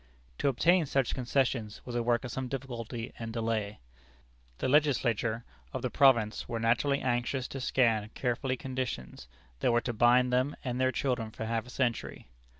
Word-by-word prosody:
To - - +1
obtain 165 +5 +3
such 135 -2 +1
concessions 125 -4 0
was 125 - -6
a 120 - 0
work 120 +1 +1
of 120 - -5
some 130 +1 -3
difficulty 120 -3 -5
and 115 -1 -5
delay. 110 -2 -2 0.8
The - - -1
Legislature 120 -5 +2 0.3
of - - -4
the - - -1
province 120 -6 +3
were 115 - -2
naturally 115 +5 +2
anxious 125 +1 -1
to 135 - -5
scan 115 -5 +2
carefully 130 +1 -1
conditions 125 - -5 0.3
that - - +2
were 120 0 +3
to 120 - -3
bind 125 +2 +4
them 130 +3 +1
and 125 -1 -2
their 130 0 +3
children 125 -5 -1
for 110 - -6
half 115 +1 -2
a - - -11
century. 125 -3 -2
120 Hz, 170 wpm, -30 LUFS, 115-130 Hz, 0.8 s, bind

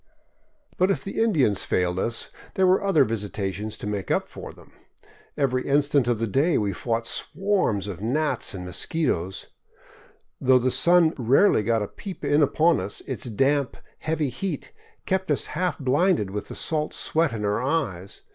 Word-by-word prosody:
But 185 +2 +4
if 195 - 0
the 195 - -3
Indians 145 - +2
failed 90 0 0
us, 115 +3 -2 0.2
there 190 - +3
were 185 +2 +3
other 170 -9 +4
visitations 105 -1 -3
to - - -7
make 105 -2 -3
up - - +1
for - - -9
them. - - -19 0.6
Every 130 -3 0
instant 140 -2 +2
of 120 -2 +1
the 115 - -1
day 140 - +2
we 100 -2 0
fought 115 +4 -2
swarms 185 - 0
of 95 -2 -6
gnats 140 0 0
and 90 -1 -6
mosquitos; 95 - -1 1.0
though 130 0 +5
the 125 +1 +1
sun 170 +1 +4
rarely 130 - +4
got 115 0 +1
a - - -4
peep 190 - -8
in 145 +2 +3
upon 160 +3 +3
us, - - -5
its 130 -1 -5
damp, 135 +4 0 0.2
heavy 155 -3 -1
heat 150 - -4 0.3
kept 190 -1 -1
us 145 - 0
half 180 +2 -1
blinded 140 - +1
with 105 0 -5
the - - -8
salt 155 -1 -2
sweat 160 -2 +1
in 110 -2 -3
our 105 +3 0
eyes. 125 - -2
130 Hz, 170 wpm, -25 LUFS, 105-160 Hz, 1.0 s, though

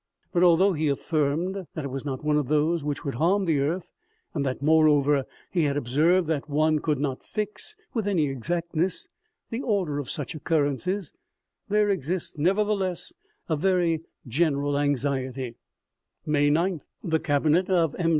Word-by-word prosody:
But 175 - +2
although 180 +2 +5
he 155 -1 0
affirmed 160 +6 -1
that 155 - -3
it 140 - -4
was 135 +1 -5
not 135 -1 -4
one 150 0 +2
of 150 -3 +1
those 155 +2 +1
which 145 -1 -3
would 140 - -2
harm 185 +9 +2
the 160 -4 +2
earth, 165 +6 -2 0.4
and 145 - -1
that, 130 -2 -2
moreover, 145 -2 +4 0.3
he 175 -5 +2
had 140 0 0
observed 155 +8 +3
that 155 -2 -2
one 155 +1 +2
could 150 -1 0
not 135 -2 -2
fix, 210 - -4 0.2
with 220 -4 -1
any 180 -7 +2
exactness, 170 +6 -2 0.4
the 230 +3 -2
order 190 - 0
of 140 - -5
such 145 -4 -4
occurrences, 160 +4 -1 0.6
there 210 0 +3
exists, 175 -2 -2
nevertheless, 195 +1 0 0.3
a 160 - +1
very 170 -1 +1 0.3
general 145 +1 +1
anxiety, 135 -3 -1 0.4
" - - -53
May 145 -1 +3
9th. 165 +2 +1 0.2
The 160 -4 +1
cabinet 155 +6 +2
of 170 -5 +2
M. 165 -2 +2
155 Hz, 160 wpm, -26 LUFS, 145-180 Hz, 0.6 s, although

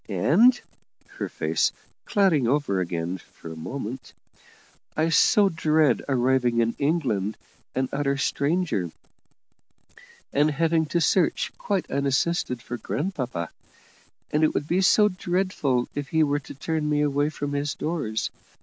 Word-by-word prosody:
And," 200 - +4 0.6
her - - -2
face - - 0 0.3
clouding 185 - +3
over 135 -7 +1
again 85 0 -3
for 80 - -12
a - - -10
moment 120 +7 -6 0.8
"I 160 +2 +2
so 200 +5 +5
dread 155 -4 +2
arriving 125 -2 +2
in 115 0 +2
England 125 - 0 0.4
an 130 0 0
utter 140 -1 0
stranger, 140 - 0 1.4
and 145 +2 +3
having 160 +1 +1
to 170 +3 0
search, 175 +1 +2
quite 200 -3 -1
unassisted, 140 -2 0
for 120 - -5
grandpapa; 125 - -3 0.8
and 150 +1 +2
it 155 - +2
would 145 - -1
be 180 +4 +2
so 210 +2 +5
dreadful 180 -9 -1
if 145 -1 -4
he 160 -1 +2
were 145 -1 +1
to 140 - -11
turn 155 +2 -2
me 150 0 +2
away 145 0 +1
from 145 -2 -4
his 145 0 -1
doors. 145 -10 -2
145 Hz, 135 wpm, -25 LUFS, 125-165 Hz, 1.4 s, so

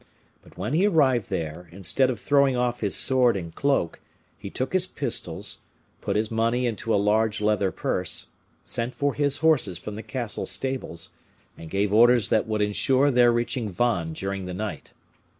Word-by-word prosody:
But - - -20
when 105 +8 -3
he 185 +6 +3
arrived 135 - +2
there, 80 +2 -4
instead 100 +8 +1
of 120 -4 -3
throwing 140 -2 +3
off 120 0 0
his 100 -3 0
sword 125 -5 +3
and 85 -3 -7
cloak, 140 -12 0 0.4
he 100 - -8
took 130 - -3
his 185 0 +3
pistols, - - -2 0.4
put - - -2
his 110 +1 0
money 115 +2 +1
into 115 -1 -2
a - - +4
large 105 +2 +1
leather 105 -2 +1
purse, - - -1 0.4
sent 120 +2 -3
for 145 -1 0
his 145 -1 +1
horses 130 - +3
from 105 - -7
the 110 - -6
castle 110 +1 -4
stables, 130 -11 -4 0.4
and 80 - -10
gave 100 +2 0
orders 120 0 +5
that 110 - +2
would 110 -1 -1
ensure 130 +7 +2
their 120 -1 +5
reaching 120 -1 -1
Vannes 90 -6 -1
during 95 -1 -3
the 90 0 -5
night. 105 +2 -6
115 Hz, 175 wpm, -25 LUFS, 100-130 Hz, 0.4 s, orders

